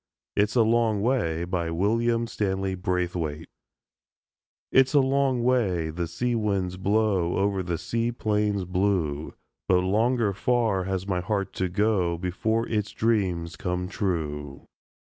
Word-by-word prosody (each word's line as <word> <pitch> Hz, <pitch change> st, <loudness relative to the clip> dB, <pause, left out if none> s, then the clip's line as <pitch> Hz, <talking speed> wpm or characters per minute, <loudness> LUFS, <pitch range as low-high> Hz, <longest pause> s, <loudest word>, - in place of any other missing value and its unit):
IT'S 105 Hz, +3 st, +1 dB
A 120 Hz, -, +5 dB
LONG 110 Hz, -2 st, +2 dB
WAY 85 Hz, -10 st, 0 dB
WILLIAM 100 Hz, +7 st, 0 dB
STANLEY 95 Hz, -4 st, -2 dB
BRAITHWAITE 90 Hz, -4 st, -2 dB, 1.2 s
It's 135 Hz, +2 st, +4 dB
a -, -, +7 dB
long 135 Hz, -2 st, +2 dB
way 95 Hz, -11 st, +1 dB
the 85 Hz, +1 st, -3 dB
sea 120 Hz, +9 st, -1 dB
winds 100 Hz, -5 st, -1 dB
blow 100 Hz, -3 st, +1 dB
Over 100 Hz, -1 st, +1 dB
the 85 Hz, -2 st, -2 dB
sea 115 Hz, +8 st, -1 dB
plains 105 Hz, -4 st, 0 dB
blue, 90 Hz, -5 st, -1 dB, 0.3 s
But 90 Hz, -1 st, +4 dB
longer 110 Hz, +3 st, +1 dB
far 110 Hz, -3 st, +1 dB
has 95 Hz, -1 st, -2 dB
my 95 Hz, -3 st, -1 dB
heart 100 Hz, +1 st, -2 dB
to 95 Hz, -1 st, -1 dB
go 95 Hz, -3 st, +1 dB
Before 110 Hz, +6 st, -1 dB
its 105 Hz, -1 st, -1 dB
dreams 90 Hz, -7 st, 0 dB
come 90 Hz, +2 st, -2 dB
true. 75 Hz, -8 st, -3 dB
95 Hz, 130 wpm, -26 LUFS, 90-110 Hz, 1.2 s, a